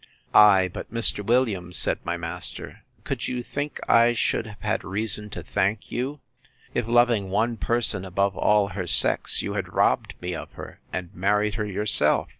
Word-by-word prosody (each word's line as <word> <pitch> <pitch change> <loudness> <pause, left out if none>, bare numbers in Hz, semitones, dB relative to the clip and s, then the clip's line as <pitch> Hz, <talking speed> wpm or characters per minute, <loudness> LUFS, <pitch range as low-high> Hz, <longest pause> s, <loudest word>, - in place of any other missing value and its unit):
Ay, 100 -3 +7
but 90 - -8
Mr. 115 -2 -1
Williams, 100 -7 0
said - - 0
my 85 0 -2
master, 85 +1 -6 0.2
could - - -3
you 125 -1 -3
think 145 +4 -4
I 120 +1 +5
should 115 - 0
have 105 -1 -12
had 105 - -1
reason 105 +1 -3
to - - -7
thank 100 +1 -1
you, 135 +4 -3 0.5
if, 120 -2 -1
loving 120 -4 +3
one 115 +5 0
person 115 -5 0
above 95 +1 0
all 105 -1 +3
her 90 -2 -5
sex, - - +3
you - - -3
had - - -4
robbed - - +1
me 90 0 -4
of - - -7
her, - - -10
and 90 -2 -5
married 105 +3 +1
her 105 -1 -2
yourself? 105 +1 +2
105 Hz, 175 wpm, -25 LUFS, 95-115 Hz, 0.5 s, Ay